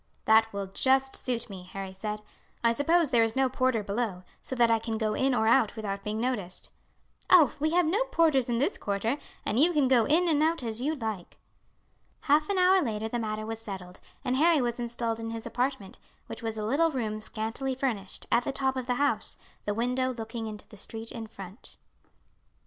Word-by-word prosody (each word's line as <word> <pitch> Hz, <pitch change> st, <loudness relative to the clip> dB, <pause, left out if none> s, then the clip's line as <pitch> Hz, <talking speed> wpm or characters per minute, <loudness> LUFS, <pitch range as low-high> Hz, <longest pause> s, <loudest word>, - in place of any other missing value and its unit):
"That 220 Hz, 0 st, +5 dB
will 200 Hz, -1 st, -3 dB
just 265 Hz, +7 st, +1 dB
suit 240 Hz, -2 st, -2 dB
me," 195 Hz, -4 st, -8 dB
Harry 190 Hz, +1 st, -7 dB
said. 210 Hz, +2 st, -5 dB, 0.4 s
"I 230 Hz, -, +5 dB
suppose 305 Hz, +5 st, +2 dB
there 235 Hz, -, +5 dB
is 225 Hz, 0 st, 0 dB
no 265 Hz, -1 st, +3 dB
porter 255 Hz, -4 st, +1 dB
below, 200 Hz, -3 st, -2 dB, 0.2 s
so 260 Hz, -, -3 dB
that 235 Hz, -2 st, +4 dB
I 225 Hz, -, +4 dB
can 225 Hz, 0 st, -3 dB
go 215 Hz, -1 st, 0 dB
in 265 Hz, +3 st, +1 dB
or 220 Hz, -, +2 dB
out 230 Hz, -2 st, +4 dB
without 200 Hz, -3 st, -4 dB
being 210 Hz, +1 st, -3 dB
noticed." 225 Hz, -7 st, -1 dB, 0.6 s
"Oh, 330 Hz, -8 st, +7 dB
we 310 Hz, +2 st, +1 dB
have 355 Hz, 0 st, +4 dB
no 395 Hz, +10 st, +2 dB
porters 320 Hz, -, +2 dB
in 235 Hz, -, +1 dB
this 285 Hz, -, 0 dB
quarter, 215 Hz, +7 st, -1 dB, 0.3 s
and 225 Hz, -, 0 dB
you 330 Hz, +5 st, +5 dB
can 290 Hz, -4 st, +3 dB
go 250 Hz, -4 st, +4 dB
in 335 Hz, +5 st, +3 dB
and 305 Hz, -3 st, +3 dB
out 320 Hz, -2 st, +1 dB
as 225 Hz, 0 st, -2 dB
you 305 Hz, +4 st, 0 dB
like." 220 Hz, -, -5 dB, 0.8 s
Half 300 Hz, +3 st, +3 dB
an 400 Hz, -, +1 dB
hour 370 Hz, +1 st, +5 dB
later 220 Hz, -4 st, -2 dB
the 240 Hz, -, -2 dB
matter 215 Hz, -1 st, -3 dB
was 225 Hz, 0 st, -5 dB
settled, 185 Hz, -4 st, -8 dB, 0.3 s
and 255 Hz, 0 st, +1 dB
Harry 325 Hz, +1 st, +5 dB
was 240 Hz, -1 st, -1 dB
installed 235 Hz, -1 st, -2 dB
in 225 Hz, 0 st, -4 dB
his 225 Hz, 0 st, -6 dB
apartment, 245 Hz, -3 st, -2 dB, 0.3 s
which -, -, -8 dB
was 225 Hz, -1 st, -3 dB
a 210 Hz, -, -2 dB
little 295 Hz, +9 st, +3 dB
room 220 Hz, -7 st, -2 dB
scantily 225 Hz, +5 st, -3 dB
furnished, 225 Hz, -8 st, -2 dB
at 240 Hz, -, +4 dB
the -, -, -2 dB
top 265 Hz, -1 st, 0 dB
of 255 Hz, -1 st, -4 dB
the 250 Hz, -, +1 dB
house, 285 Hz, +2 st, +1 dB, 0.3 s
the 205 Hz, -, 0 dB
window 250 Hz, +2 st, 0 dB
looking 225 Hz, 0 st, -5 dB
into 210 Hz, -1 st, -8 dB
the 210 Hz, -, -14 dB
street 225 Hz, +3 st, -6 dB
in 225 Hz, -2 st, -6 dB
front. 195 Hz, 0 st, -11 dB
235 Hz, 210 wpm, -28 LUFS, 215-270 Hz, 0.8 s, Oh